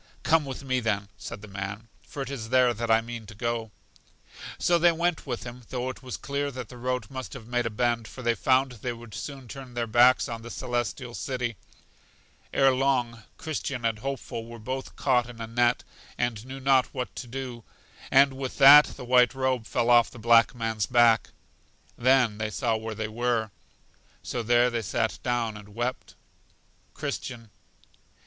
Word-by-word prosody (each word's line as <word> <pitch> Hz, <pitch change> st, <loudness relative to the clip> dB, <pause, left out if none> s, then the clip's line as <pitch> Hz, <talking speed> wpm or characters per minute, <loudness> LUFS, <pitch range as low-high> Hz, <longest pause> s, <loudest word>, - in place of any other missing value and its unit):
Come 160 Hz, -2 st, +3 dB
with 135 Hz, 0 st, -6 dB
me, 130 Hz, -1 st, 0 dB
then, 105 Hz, -4 st, -1 dB
said 100 Hz, -, -8 dB
the -, -, -9 dB
man, 100 Hz, +2 st, -6 dB
for 140 Hz, -, -6 dB
it 135 Hz, -, -7 dB
is 115 Hz, -5 st, -5 dB
there 125 Hz, -1 st, +4 dB
that 115 Hz, +1 st, -4 dB
I 110 Hz, 0 st, +5 dB
mean 115 Hz, -1 st, -8 dB
to 105 Hz, -, -11 dB
go. 115 Hz, 0 st, -2 dB, 0.9 s
So 175 Hz, -1 st, +3 dB
they 175 Hz, +1 st, +6 dB
went 170 Hz, -1 st, -1 dB
with 120 Hz, -3 st, -3 dB
him, 120 Hz, +1 st, -9 dB
though 125 Hz, 0 st, -2 dB
it -, -, -14 dB
was 125 Hz, -2 st, -6 dB
clear 140 Hz, +1 st, -2 dB
that 125 Hz, -4 st, -7 dB
the 125 Hz, -, -11 dB
road 125 Hz, -2 st, -3 dB
must 130 Hz, -1 st, -6 dB
have 125 Hz, -5 st, -9 dB
made 120 Hz, 0 st, -1 dB
a -, -, -1 dB
bend, 115 Hz, 0 st, 0 dB
for 130 Hz, -, -10 dB
they 120 Hz, 0 st, +3 dB
found 130 Hz, +2 st, +2 dB
they 120 Hz, +1 st, -4 dB
would 115 Hz, -2 st, -12 dB
soon 135 Hz, -3 st, -7 dB
turn 130 Hz, -1 st, -9 dB
their 120 Hz, -1 st, 0 dB
backs 120 Hz, +3 st, +5 dB
on 115 Hz, -1 st, -5 dB
The 120 Hz, -, -9 dB
Celestial 120 Hz, -1 st, -3 dB
City. 125 Hz, -2 st, -3 dB, 1.0 s
Ere 135 Hz, -1 st, +4 dB
long, 125 Hz, -3 st, 0 dB, 0.2 s
Christian 140 Hz, -5 st, -4 dB
and 110 Hz, -2 st, 0 dB
Hopeful 125 Hz, -3 st, -5 dB
were 115 Hz, 0 st, -9 dB
both 130 Hz, +4 st, -5 dB
caught 125 Hz, -3 st, +1 dB
in 120 Hz, -1 st, -11 dB
a 115 Hz, -, -4 dB
net, 120 Hz, +1 st, +1 dB, 0.3 s
and 120 Hz, -1 st, -2 dB
knew 135 Hz, +1 st, -7 dB
not 135 Hz, -1 st, +3 dB
what 125 Hz, -1 st, -4 dB
to 125 Hz, -, -6 dB
do; 125 Hz, -2 st, -6 dB, 0.5 s
and 135 Hz, 0 st, +5 dB
with 130 Hz, -1 st, -5 dB
that 145 Hz, +2 st, +10 dB
the 125 Hz, -, -8 dB
white 125 Hz, +1 st, +4 dB
robe 130 Hz, -3 st, 0 dB
fell 120 Hz, 0 st, +1 dB
off 120 Hz, -1 st, +6 dB
the -, -, -13 dB
black 115 Hz, +2 st, +4 dB
man's 115 Hz, -3 st, -1 dB
back. 120 Hz, -2 st, +4 dB, 0.7 s
Then 125 Hz, -4 st, +3 dB
they 110 Hz, -1 st, -1 dB
saw 115 Hz, +2 st, 0 dB
where 110 Hz, 0 st, -5 dB
they 110 Hz, 0 st, -3 dB
were. 115 Hz, -1 st, -1 dB, 0.7 s
So 120 Hz, -, -3 dB
there 120 Hz, +2 st, +3 dB
they 120 Hz, -1 st, -1 dB
sat 110 Hz, +1 st, -1 dB
down 120 Hz, -3 st, -1 dB
and 105 Hz, -1 st, -12 dB
wept. 120 Hz, +2 st, -3 dB, 0.8 s
Christian. 115 Hz, -4 st, -5 dB
120 Hz, 190 wpm, -27 LUFS, 115-130 Hz, 1.0 s, that